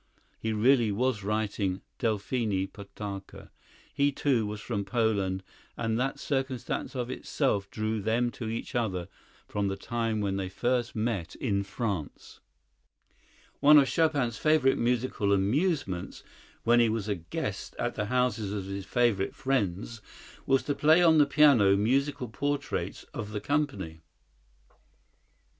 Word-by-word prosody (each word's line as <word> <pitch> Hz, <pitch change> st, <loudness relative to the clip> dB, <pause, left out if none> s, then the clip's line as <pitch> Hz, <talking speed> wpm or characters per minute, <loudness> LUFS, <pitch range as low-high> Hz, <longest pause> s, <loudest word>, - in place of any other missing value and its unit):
He 110 Hz, -, -2 dB
really 115 Hz, +1 st, +3 dB
was 115 Hz, 0 st, 0 dB
writing 100 Hz, -2 st, -1 dB, 0.2 s
"Delphine 105 Hz, -2 st, 0 dB
Potocka." 100 Hz, -1 st, -8 dB, 0.4 s
He, 140 Hz, 0 st, +2 dB
too, 130 Hz, -6 st, +1 dB
was 105 Hz, 0 st, -5 dB
from 105 Hz, -2 st, -3 dB
Poland, 100 Hz, -3 st, 0 dB, 0.3 s
and 115 Hz, 0 st, -1 dB
that 135 Hz, +2 st, -1 dB
circumstance 135 Hz, -2 st, -2 dB
of 125 Hz, -1 st, -2 dB
itself 105 Hz, -7 st, -1 dB
drew 110 Hz, 0 st, -2 dB
them 120 Hz, +3 st, +1 dB
to 115 Hz, -, -6 dB
each 115 Hz, -, -5 dB
other 95 Hz, -8 st, -1 dB, 0.4 s
from 100 Hz, -1 st, -1 dB
the 95 Hz, -, -1 dB
time 115 Hz, 0 st, -2 dB
when 100 Hz, -2 st, -1 dB
they 95 Hz, -1 st, -3 dB
first 120 Hz, +4 st, -1 dB
met 110 Hz, -6 st, -2 dB
in 100 Hz, -6 st, 0 dB
France. 100 Hz, -, -5 dB, 1.2 s
One 150 Hz, +1 st, +8 dB
of 140 Hz, -2 st, +6 dB
Chopin's 145 Hz, -9 st, +1 dB
favorite 155 Hz, -4 st, +3 dB
musical 120 Hz, -3 st, 0 dB
amusements, 100 Hz, -, 0 dB, 0.4 s
when 120 Hz, +1 st, +5 dB
he 120 Hz, -1 st, +4 dB
was 110 Hz, -2 st, -2 dB
a 105 Hz, -, +1 dB
guest 85 Hz, -3 st, -5 dB
at -, -, -1 dB
the 105 Hz, -, -2 dB
houses 120 Hz, -3 st, 0 dB
of 100 Hz, -2 st, -3 dB
his 100 Hz, 0 st, -6 dB
favorite 115 Hz, -6 st, +1 dB
friends, 115 Hz, -4 st, -1 dB, 0.5 s
was 135 Hz, -1 st, +3 dB
to 145 Hz, -, -1 dB
play 155 Hz, +5 st, +5 dB
on 160 Hz, -2 st, +6 dB
the 145 Hz, -, +5 dB
piano 140 Hz, -10 st, +5 dB
musical 130 Hz, +5 st, +1 dB
portraits 145 Hz, +5 st, -3 dB
of 105 Hz, 0 st, -5 dB
the 105 Hz, -, -2 dB
company. 100 Hz, -, -2 dB
110 Hz, 140 wpm, -29 LUFS, 100-130 Hz, 1.2 s, One